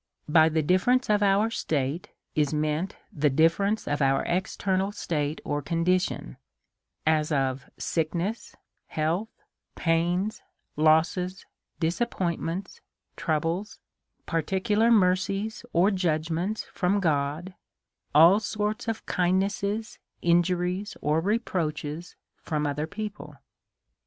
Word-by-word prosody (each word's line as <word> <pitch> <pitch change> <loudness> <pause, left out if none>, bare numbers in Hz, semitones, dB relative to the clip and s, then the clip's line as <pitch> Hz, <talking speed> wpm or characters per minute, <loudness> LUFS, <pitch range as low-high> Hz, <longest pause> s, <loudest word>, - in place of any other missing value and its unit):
By 160 +1 +5
the 160 0 +1
difference 215 - +2
of 210 -1 +3
our 205 +2 +3
state 150 -4 -2 0.2
is 150 0 +1
meant 155 +4 -1 0.2
the 150 -1 +2
differ 165 +7 +3
ence 215 +2 -1
of 145 0 -1
our 135 0 +3
eternal 190 +2 0
state 150 -6 -2
or 145 0 -1
condition^, 165 - 0 0.7
as 155 0 +2
of 135 -2 -1
sickness, 170 +7 -2 0.3
health, 165 +8 -1 0.5
pains, 175 +5 0 0.3
losses, 165 +5 +2 0.3
disappointments, 175 -1 -2 0.3
troubles, 165 +6 -1 0.5
parti 165 +3 -1
cular 220 +3 +3
mercies 200 +2 +2
or 185 +5 +4
judgments 175 +2 -1
from 195 +2 +1
God; 155 +1 -1 0.6
all 170 +7 +8
sorts 210 +1 -2
of 225 -1 -3
kindnesses, 200 +4 0 0.2
injuries, 180 +3 +1
or 150 +2 +2
reproaches, 170 -6 -2 0.3
from 150 -2 -2
other 145 +2 -2
people. 200 -6 -7
175 Hz, 105 wpm, -27 LUFS, 155-200 Hz, 0.7 s, all